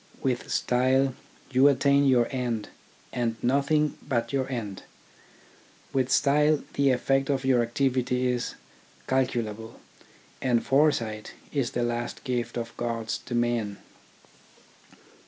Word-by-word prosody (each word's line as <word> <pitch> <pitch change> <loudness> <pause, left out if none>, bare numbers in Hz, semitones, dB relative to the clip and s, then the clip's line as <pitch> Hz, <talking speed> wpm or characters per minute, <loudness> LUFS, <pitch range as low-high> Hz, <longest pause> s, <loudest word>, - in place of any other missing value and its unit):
With 130 -3 -1
style 130 +2 +2 0.4
you 130 +2 +6
attain 140 +1 +4
your 125 -3 +4
end 120 -5 -2 0.4
and 115 -2 -1
nothing 140 +4 +1
but 120 -3 -2
your 135 -1 0
end. 105 -6 -4 1.1
With 130 -1 +1
style 150 +1 +3
the 140 0 +3
effect 135 +2 +1
of 135 -2 0
your 130 -2 +4
activity 125 +1 0
is 125 -1 -1 0.5
calculable, 115 -4 -2 0.6
and 120 -3 +1
foresight 120 -7 +1 0.2
is 135 -5 0
the 120 - 0
last 120 0 -3
gift 125 -3 -2
of 115 -1 -5
gods 115 -2 -2
to 120 - -3
men. 120 -4 0
125 Hz, 120 wpm, -27 LUFS, 120-135 Hz, 1.1 s, you